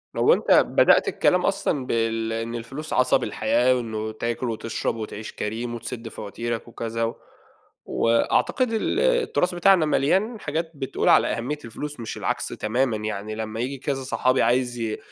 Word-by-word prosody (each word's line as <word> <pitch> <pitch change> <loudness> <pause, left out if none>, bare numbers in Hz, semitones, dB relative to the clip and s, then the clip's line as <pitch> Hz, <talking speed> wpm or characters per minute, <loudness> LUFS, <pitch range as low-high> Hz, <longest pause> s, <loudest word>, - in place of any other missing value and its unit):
لو - - +5
أنتَ - - 0
بدأت - - +5
الكلام - - +2
أصلًا 130 -3 0
بال 115 -1 0
إن 115 +1 -3
الفلوس 135 +7 -6
عَصَب 130 0 +3
الحياة، 130 +1 +2
وإنه 110 -3 -3
تاكُل 115 +2 -3
وتشرَب 115 0 -2
وتعِيش 110 -1 -6
كريم 120 +3 -4
وتسُدّ 115 0 -6
فواتيرك 115 +2 -5
وكذا، 115 0 -4
و 115 - -1 0.7
وأعتقد 225 - +1
ال 225 - 0
التراث 475 - +1
بتاعنا 175 -2 +5
ملْيان 190 - +1
حاجات 160 0 -3
بتقول 135 -2 -1
على - - +6
أهمِّية 130 +6 -2
الفلوس 145 +5 -7
مش 115 - -5
العكس - - -2
تمامًا. 120 +1 -1
يعني 105 0 -4
لمّا 110 0 -5
ييجي 135 +3 -2
كذا 135 0 -3
صَحَابي 130 0 +1
عايِز 120 0 +1
ي 110 -2 -2
120 Hz, 155 wpm, -24 LUFS, 115-140 Hz, 0.7 s, على